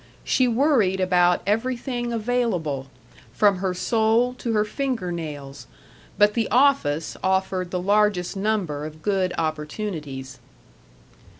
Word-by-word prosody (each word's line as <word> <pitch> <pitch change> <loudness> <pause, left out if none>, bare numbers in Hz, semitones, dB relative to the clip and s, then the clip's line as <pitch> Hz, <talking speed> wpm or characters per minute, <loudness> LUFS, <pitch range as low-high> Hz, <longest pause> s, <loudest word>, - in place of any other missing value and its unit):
She 255 - +2
worried 235 -6 +2
about 180 -1 +3
everything 240 +3 -1
available, 215 - -1 0.5
from 200 +7 +3
her 185 0 -2
soul 225 +5 +2
to 235 - -2
her 210 -1 +2
finger 240 -6 -2
nails; 145 -6 -7 0.5
but 210 0 +5
the 230 -2 -1
office 235 - +2
offered 190 -1 0
the 180 - -2
largest 200 -1 +1
number 195 -8 -1
of 155 0 -13
good 190 -3 +1
opportunities. 150 - -4
190 Hz, 115 wpm, -23 LUFS, 165-225 Hz, 0.5 s, but